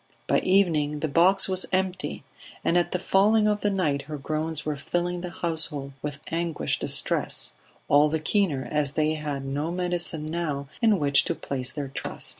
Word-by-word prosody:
By - - +3
evening 160 -6 +2
the 160 - 0
box 175 +6 +3
was 185 -1 +1
empty, 185 0 -1 0.4
and 170 - +1
at 175 -1 +2
the - - +1
falling 210 +4 +3
of 210 0 +1
the 205 - +2
night 160 -8 0
her 150 - -4
groans 155 +1 -2
were 150 -1 -1
filling 175 +4 -2
the 180 - -5
household 155 -5 0
with 145 -1 -5
anguished 165 -1 -1
distress, - - +1 0.3
all 145 +1 +5
the 160 +1 -1
keener 155 -5 0
as 150 -2 +1
they 155 0 +1
had 145 -3 -4
no 145 +4 -2
medicine 175 -3 -1
now 155 -3 -3
in 220 -3 +4
which 140 -3 +4
to - - -1
place 130 -2 -3
their 145 -2 -5
trust. - - -4
160 Hz, 180 wpm, -26 LUFS, 145-180 Hz, 0.4 s, all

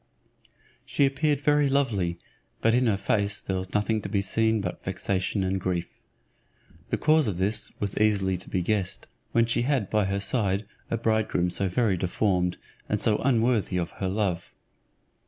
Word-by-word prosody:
She 140 - +2
appeared 145 +1 +1
very 145 -1 +3
lovely, 105 -11 0 0.4
but 115 - +3
in 125 +1 +3
her 105 -3 +2
face 100 +1 0
there 95 - -2
was 95 0 -5
nothing 110 +1 +1
to - - -6
be 100 -2 0
seen 110 +2 +2
but 90 -3 -5
vexation 95 +1 -1
and 95 0 -1
grief. 90 -2 -3 0.9
The - - 0
cause 155 -2 +3
of 95 -5 -2
this 100 +4 0
was 100 -1 -2
easily 100 -3 +2
to 90 - -6
be 90 - -1
guessed, 100 -1 -1 0.3
when 115 0 +3
she 120 +1 0
had 125 -5 0
by 105 -2 +2
her 100 +1 -1
side 100 -1 0 0.2
a 115 - 0
bridegroom 110 -6 +1
so 95 +1 0
very 100 0 +1
deformed, 90 -1 0 0.3
and - - +1
so 105 -1 +4
unworthy 115 -6 +1
of 85 -2 -2
her 95 - 0
love. 95 -3 -2
105 Hz, 175 wpm, -26 LUFS, 95-115 Hz, 0.9 s, so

